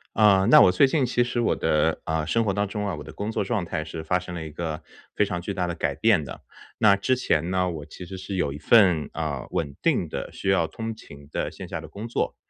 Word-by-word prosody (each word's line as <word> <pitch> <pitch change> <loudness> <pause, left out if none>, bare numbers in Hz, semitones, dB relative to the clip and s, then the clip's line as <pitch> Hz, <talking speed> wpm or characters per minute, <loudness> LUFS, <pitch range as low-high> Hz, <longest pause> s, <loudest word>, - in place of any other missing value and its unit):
呃， 100 -3 +5
那 - - +9
我 - - +7
最 95 +10 +5
近 135 -1 +1
其 120 0 +1
实 120 0 -2
我 120 - +1
的， 75 +1 +1
啊， 80 -1 -1
生 115 +6 +1
活 100 - +1
当 100 +1 -1
中 105 +1 -3
啊， 100 - -2
我 75 - -7
的 - - -10
工 105 +2 -4
作 - - 0
状 110 -7 -1
态 80 -2 -3
是 80 0 -7
发 90 +3 +1
生 90 0 -8
了 85 -2 -5
一 80 - -7
个 80 +1 -5 0.3
非 - - +4
常 90 -3 -3
巨 100 +3 -4
大 90 -2 -1
的 85 - -3
改 75 -3 -1
变 105 -1 +3
的。 65 -3 -9 0.3
那 100 -2 +5
之 130 +6 +1
前 85 -9 0
呢， 90 -1 +1
我 75 -4 -7
其 85 +4 -10
实 95 +1 -8
是 95 +1 -5
有 75 -6 0
一 75 - -7
份， 90 -2 +4
啊， - - -3
稳 70 -3 -2
定 - - +1
的 - - -5
需 95 - -2
要 95 -4 +3
通 115 +7 -5
勤 70 -9 -14
的 - - -2
线 - - -9
下 - - -5
的 - - -10
工 105 +3 -7
作。 120 - -2
90 Hz, 290 characters per minute, -25 LUFS, 80-105 Hz, 0.3 s, 那